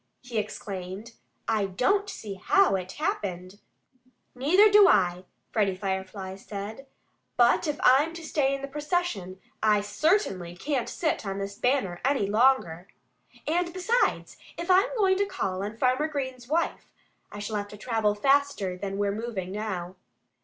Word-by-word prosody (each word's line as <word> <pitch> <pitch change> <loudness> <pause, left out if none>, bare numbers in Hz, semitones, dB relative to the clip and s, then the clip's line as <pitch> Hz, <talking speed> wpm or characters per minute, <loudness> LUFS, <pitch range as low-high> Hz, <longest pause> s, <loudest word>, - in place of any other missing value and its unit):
he 245 -3 -2
exclaimed. 195 0 -6 0.4
"I 220 -3 +1
don't 325 - +1
see 215 - -6
how 375 - +3
it 185 -1 -4
happened." 200 - -3 0.7
"Neither 335 +12 +5
do 415 -1 +8
I!" 180 - +2 0.3
Freddie 200 -4 +1
Firefly 190 0 -4
said. 210 +6 -7 0.5
"But 240 +7 +4
if 295 -1 -2
I'm 280 +6 +5
to 335 - -8
stay 275 -3 +1
in 275 - -8
the - - -3
procession 290 - -2 0.2
I 210 -1 +4
certainly 205 - 0
can't 275 -1 -2
sit 315 -3 -1
on 195 -1 -4
this 200 0 -4
banner 245 -10 0
any 270 -6 +2
longer. 205 -6 +2 0.6
And 345 +2 0
besides, 375 +7 0 0.2
if 345 +2 -1
I'm 375 +2 +5
going 380 -3 +3
to 405 - +2
call 195 - -3
on 210 +2 -5
Farmer 255 +5 +2
Green's 260 -5 -5
wife 330 +5 -1 0.4
I - - -8
shall 210 +1 -3
have 205 0 -3
to 210 - -11
travel 215 -1 0
faster 275 -6 +1
than 195 0 -4
we're 200 0 +1
moving 205 -4 -4
now." 190 -3 -4
220 Hz, 155 wpm, -27 LUFS, 195-295 Hz, 0.7 s, do